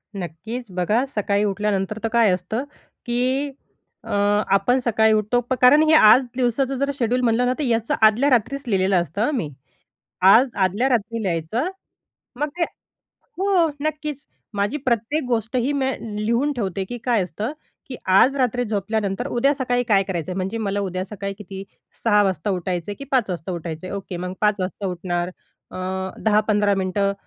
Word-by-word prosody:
नक्कीच. 195 +7 -6
बघा 195 +8 +1
सकाळी 205 -1 +1
उठल्यानंतर 205 0 -1
तर - - +1
काय 230 -4 +5
असतं 180 +7 -2 0.4
की 255 +4 0 0.5
अ, - - -11 0.5
आपण 245 +7 +2
सकाळी 220 -3 +3
उठतो 215 +3 +1
प - - +2
कारण 255 +5 +7
हे 315 - +5
आज 240 -3 +7
दिवसाचं 260 +2 +1
जर 280 +2 0
शेड्यूल 245 +1 +1
म्हटलं 240 0 +2
ना, 250 - +2
तर - - 0
याचं 230 -3 0
आदल्या 220 +6 +5
रात्रीच 260 +3 +1
लिहिलेलं 190 -3 +2
असतं 200 +5 -2
हं 300 - 0
मी. 160 -10 -2 0.7
आज 220 +8 +6
आदल्या 205 +8 +1
रात्री 230 -2 0
लिहायचं. 185 - -1 0.7
मग 295 - +1
ते 350 - +2 0.8
हो, 380 -4 +3
नक्कीच. 300 -2 -3 0.3
माझी 205 +7 0
प्रत्येक 240 +6 0
गोष्ट 230 -1 -1
ही 250 +3 +1
मी 270 -2 0 0.4
लिहून 240 +6 +1
ठेवते, 195 -5 -2
की 245 +5 -6
काय 235 -6 +2
असतं 205 - -4 0.4
की 255 - -5 0.2
आज 275 +2 +4
रात्री 250 -1 +1
झोपल्यानंतर 205 -1 -2
उद्या 275 +4 +2
सकाळी 245 -2 0
काय 195 0 +4
करायचं 185 -2 -4
आहे. 180 - -4
म्हणजे 190 +4 -2
मला 205 -2 -1
उद्या 185 +1 -3
सकाळी 200 0 -5
किती 195 -1 -8 0.4
6:00 210 -2 +4
वाजता 195 +2 -1
उठायचं 180 0 -2
आहे - - -5
की 275 - -9
5:00 250 -6 +2
वाजता 175 0 -4
उठायचं 170 0 -5
आहे? 190 - -5
ओके. 190 -2 -6
मग 180 +1 -4
5:00 210 -1 +2
वाजता 195 +2 -3
उठणार. 175 -1 -2 0.4
अ, - - -7 0.5
10-15 210 -1 +3
मिनिटं 195 +1 0
215 Hz, 170 wpm, -22 LUFS, 195-250 Hz, 0.8 s, कारण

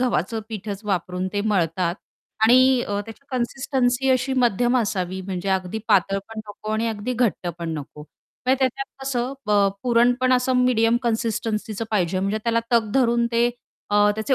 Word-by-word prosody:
गव्हाचं 225 -3 0
पीठच 205 -2 -5
वापरून 180 -2 -2
ते 205 - 0
मळतात 180 -4 0 0.5
आणि 255 +2 +5
त्याची 205 +4 -4
अ, 275 -2 -9
कन्सिस्टन्सी 255 +1 0
अशी 260 +1 +1
मध्यम 245 0 +2
असावी 190 -4 -2
म्हणजे 185 0 -4
अगदी 190 +2 -1
पातळ 195 +1 +3
पण 225 - -8
नको 210 +1 -8
आणि 220 +1 0
अगदी 220 +3 -3
घट्ट 225 -7 0
पण 170 -1 -4
नको. 145 +1 -10 0.5
म्हणजे 260 +1 +3
त्याच्यात 270 +1 0 0.2
कसं 260 -1 -1
ब - - -2 0.3
पुरण 240 0 +4
पण 255 0 +3
असं 255 +1 +2
मीडियम 235 -2 +3
कन्सिस्टन्सीचं 225 -2 -2
पाहिजे, 185 -3 +1
म्हणजे 200 +3 -1
त्याला 230 0 +2
तग 225 -3 +3
धरून 235 -3 +3
ते 235 +1 +3 0.4
अ, 205 0 +5
त्याचे 220 +5 +1
225 Hz, 165 wpm, -23 LUFS, 200-245 Hz, 0.5 s, आणि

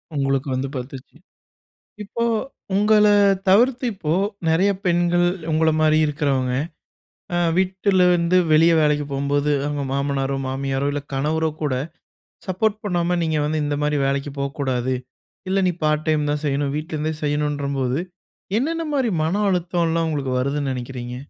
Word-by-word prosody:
உங்களுக்கு 135 0 0
வந்து 135 +1 -2
பத்துச்சு. 130 +2 -9 0.9
இப்போ, 235 +3 -3 0.5
உங்கள 210 +1 +4 0.4
தவிர்த்து 245 +6 +4
இப்போ, 160 -6 -2 0.4
நெறைய 180 +5 +3
பெண்கள் 175 0 +2 0.3
உங்கள 160 +1 +3
மாரி 155 0 +4
இருக்கிறவங்க, 140 -4 0 0.8
அ - - +1 0.2
வீட்டுல 190 0 +2
இருந்து 175 +1 +2 0.2
வெளிய 165 +2 +6
வேலைக்கி 150 -1 +2
போகும்போது, 140 +1 0
அவங்க 145 -1 -2
மாமனாரோ, 140 0 -1
மாமியாரோ, 135 +1 -2
இல்ல 145 0 -3
கணவரோ 155 +4 0
கூட 140 -4 0 0.7
சப்போர்ட் 205 +3 0
பண்ணாம, 175 -2 0
நீங்க 160 -1 0
வந்து 155 +1 -1
இந்த 145 0 -1
மாரி 150 0 +1
வேலைக்கி 140 +1 -1
போக்கூடாது. 130 -2 -1 0.5
இல்ல 195 +1 +1
நீ 180 - +2
பார்ட் 155 0 +1
டைம் 150 -1 +1
தான் 150 0 -2
செய்யணும், 140 0 0
வீட்லருந்தே 155 0 -3
செய்யணுன்றபோது, 145 -2 -1 0.6
என்னென்ன 330 +5 -1
மாரி 255 -5 +1
மன 185 +6 0
அழுத்தம்லாம் 170 -2 0
உங்களுக்கு 135 -4 -2
வருதுன்னு 140 +1 -1
நெனைக்கிறீங்க? 125 -1 -6
150 Hz, 130 wpm, -22 LUFS, 140-175 Hz, 0.9 s, வெளிய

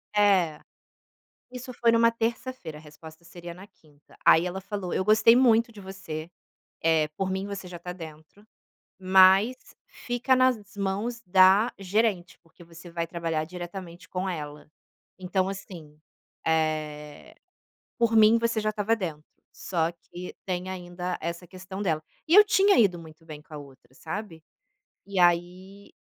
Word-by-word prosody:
É. 185 -7 +3 0.9
Isso 255 0 -8
foi 235 -1 +2
em - - +3
uma 230 0 +4
terça-feira, 230 -7 -4
a - - -13
resposta 155 +2 -14
seria 175 0 -10
na 190 +2 -12
quinta, 150 -6 -25
aí 165 +2 +6
ela 190 +2 -4
falou: 200 -3 -5
"Eu 190 - 0
gostei 220 +3 +5
muito 235 -2 +4
de 205 -2 -12
você, 165 -4 -7 0.5
eh, 160 -2 +3
por 195 -1 -2
mim 190 +1 -3
você 200 -2 -7
já 175 -1 -8
está 180 +1 -7
dentro, 160 +3 -12 0.5
mas 190 +5 +5 0.3
fica 245 +2 -1
nas 255 -1 +4 0.2
mãos 205 +5 -3
da 190 +5 +5
gerente, 195 -2 -1
porque 165 +1 -19
você 170 +1 -13
vai 170 0 -3
trabalhar 165 -2 -3
diretamente 175 0 -9
com 185 +1 -3
ela. 150 -2 -7 0.5
Então 185 +1 -1
assim, 165 -6 -10 0.5
eh, 155 -2 -2 0.6
por 230 -1 +2
mim 220 +1 +7
você 230 -1 0
já 215 0 0
estava 215 +2 0
dentro, 160 -7 -5 0.3
só 170 -2 -2
que 175 +1 -10
tem 185 0 -3
ainda 180 -1 -5
essa 170 +2 -5
questão 185 +2 -9
dela". 160 -5 -1 0.2
E 330 - +2
eu 420 +1 +9
tinha 400 -1 +4
ido 180 -5 +2
muito 160 0 -14
bem 155 -2 -10
com 155 0 -15
a - - -6
outra, 130 -3 -15
sabe. 190 -5 -7 0.6
E 200 -2 -3
aí 180 +3 0
185 Hz, 155 wpm, -26 LUFS, 165-205 Hz, 0.9 s, eu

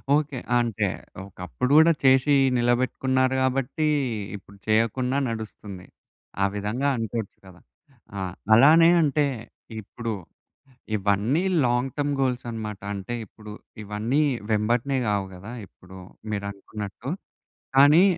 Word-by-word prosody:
Okay. 150 -3 -1 0.2
అంటే, 120 -4 0 0.4
ఒకప్పుడు 100 +7 -4
గూడా 160 +1 +7
చేసి 135 +2 +5 0.2
నిలబెట్టుకున్నారు 130 +2 +1
కాబట్టీ, 135 +4 0 0.5
ఇప్పుడు 100 0 -13
చేయకున్నా 115 +4 +1
నడుస్తుంది. 105 -4 -7 0.6
ఆ - - +5
విధంగా 105 +7 -1
అనుకోవచ్చు 115 -2 -4
గదా! 90 -1 -15 0.6
ఆ! - - -3 0.3
అలానే 155 +8 +7
అంటే 150 -1 +2 0.6
ఇప్పుడు 115 +2 -5 0.8
ఇవన్నీ 100 - +1 0.2
లాంగ్ 120 +2 0
టర్మ్ 145 0 0
గోల్స్ 125 -2 -1
అనమాట. 105 -3 -5
అంటే, 100 +4 -5
ఇప్పుడు 105 +1 -12 0.3
ఇవన్నీ 105 +8 0 0.3
వెంబటనే 120 +6 +1
గావు 100 -2 0
గదా! 100 +6 -9
ఇప్పుడు 95 +1 -15 0.3
మీరు 100 -1 -3
అనుకున్నట్టు. 105 +5 -7 0.7
కానీ, 145 +6 +7
120 Hz, 110 wpm, -25 LUFS, 105-135 Hz, 0.8 s, గూడా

